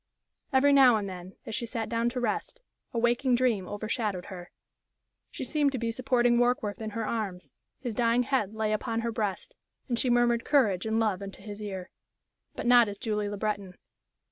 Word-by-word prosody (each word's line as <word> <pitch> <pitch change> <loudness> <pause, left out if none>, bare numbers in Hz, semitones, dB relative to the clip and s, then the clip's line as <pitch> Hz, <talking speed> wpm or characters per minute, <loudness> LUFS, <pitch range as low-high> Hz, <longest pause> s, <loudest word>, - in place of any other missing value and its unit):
Every 280 +1 +5
now 265 -4 +7
and 205 -2 -1
then, 185 0 -8
as - - -6
she 235 +1 -2
sat 225 -2 -3
down 235 0 0
to 250 +1 -4
rest, 245 - -2 0.3
a 235 - -4
waking 240 +2 +2
dream 235 -7 +1
overshadowed 210 -2 -3
her. 175 -1 -9 0.8
She - - -6
seemed 295 -3 +1
to - - -1
be 230 -1 -1
supporting 240 -1 +2
Warkworth 240 -4 +1
in 220 - -3
her 225 - -1
arms; 205 -6 -4 0.3
his 245 -4 -3
dying 235 +2 +2
head 245 -6 0
lay 215 -1 0
upon 225 +1 -1
her 230 0 -2
breast, 210 -4 -3 0.3
and 240 -3 -1
she 255 - +1
murmured 240 -1 +3
courage 220 - +2
and 220 +1 +1
love 210 -4 0
into 195 -1 -9
his 210 0 -8
ear. 190 -3 -6 0.6
But - - -5
not 240 -2 +6
as 200 - -7
Julie 210 -1 -2
Le 205 - -5
Breton. 200 -3 -3
225 Hz, 195 wpm, -28 LUFS, 205-245 Hz, 0.8 s, now